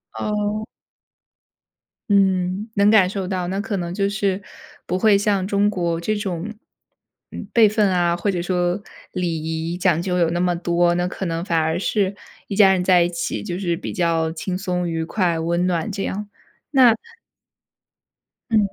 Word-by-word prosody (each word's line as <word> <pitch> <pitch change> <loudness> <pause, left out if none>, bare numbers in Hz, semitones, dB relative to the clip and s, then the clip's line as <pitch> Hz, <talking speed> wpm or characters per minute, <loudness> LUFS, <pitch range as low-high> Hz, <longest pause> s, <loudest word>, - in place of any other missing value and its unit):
哦。 210 0 -2 1.5
嗯， 190 +1 +2
能 200 0 +4
感 205 -4 +5
受 195 -1 -4
到， 185 -2 -2
那 190 +2 -2
可 205 -1 -2
能 175 -1 -4
就 200 +1 0
是 200 -1 -1 0.4
不 180 - -1
会 210 -1 +5
像 200 -2 +1
中 200 +1 +2
国 170 -4 -1
这 215 +5 -1
种， 200 0 -4 0.8
嗯， 205 - -7
辈 225 -2 +6
分 210 -1 +2
啊， 175 -2 +2
或 190 +4 -1
者 180 -3 -1
说 175 +1 0 0.3
礼 175 -4 -2
仪 160 +2 -3
讲 180 -3 +2
究 180 0 -1
有 170 -2 +3
那 170 +1 -1
么 180 0 +1
多， 175 0 +2
那 175 0 0
可 190 - -5
能 165 -1 -2
反 170 -3 0
而 160 +1 0
是 200 0 0 0.3
一 200 - -4
家 195 -2 +6
人 185 -1 0
在 180 -1 +5
一 170 - 0
起 170 -1 -3
就 175 - -4
是 175 -3 -1
比 - - -6
较 165 -3 +1
轻 180 +2 -3
松、 180 -2 -2
愉 165 -1 -2
快、 170 -2 0
温 170 +2 0
暖 180 +3 -1
这 195 -1 -3
样， 205 +2 -4 0.4
那 255 -5 +6 1.6
嗯， 220 - +4
185 Hz, 190 characters per minute, -21 LUFS, 175-200 Hz, 1.6 s, 辈